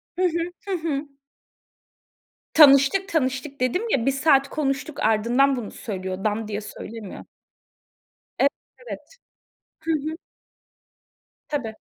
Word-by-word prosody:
Hı 365 - -3
hı. 340 -1 +1 0.3
Hı - - -3
hı. 305 -3 -2 1.5
Tanıştık, 290 +5 +7
tanıştık 275 -4 -1
dedim 255 - +1
ya, 245 - +1
1 275 - +4
saat 275 0 +3
konuştuk, 280 0 -2
ardından 235 +6 +3
bunu 230 -5 -5
söylüyor. 190 -2 -5
Dan 215 0 -1
diye 210 0 -3
söylemiyor. 215 -1 -9 1.1
Ev - - +6 0.4
evet. - - -9 0.7
Hı 325 - -2
hı. 310 +1 -2 1.3
Tabii. 255 -7 -3
275 Hz, 110 wpm, -24 LUFS, 225-310 Hz, 1.5 s, Tanıştık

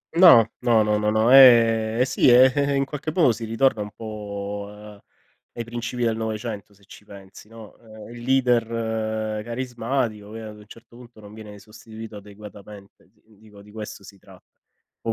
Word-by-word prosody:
No, 165 - +7
no, 115 -3 +2
no, 105 0 0
no, 110 +3 +1
ehm, 115 -4 +6
eh - - +3
sì, 130 - +1
eh, 125 +2 +6
eh, 140 -1 0
in 135 0 0
qualche 150 +2 -6
modo 155 -7 +3
si 115 +1 -6
ritorna 115 0 0
un 105 - -6
po' 105 -1 -8 0.5
ai 120 - -6
principi 120 +1 -6
del 115 -1 0
'900 110 -2 -6
se 100 0 -25
ci 105 - -16
pensi, 100 0 -15
no, 115 -2 -14
ehm, 110 -2 -14
il 120 - -11
leader 110 -4 -1
carismatico, 120 -3 -4
che 115 - -8
ad 110 -1 -10
un 105 0 -16
certo 115 +2 -17
punto 120 -2 -16
non 105 0 -14
viene 105 -2 -12
sostituito 110 +1 -12
adeguatamente, 100 -1 -14
di 110 -1 -28
dico 105 -2 -18
di 105 - -17
questo 105 -1 -9
si 100 0 -15
tratta. - - -18 0.6
Un 115 - -2
110 Hz, 175 wpm, -22 LUFS, 105-120 Hz, 0.6 s, No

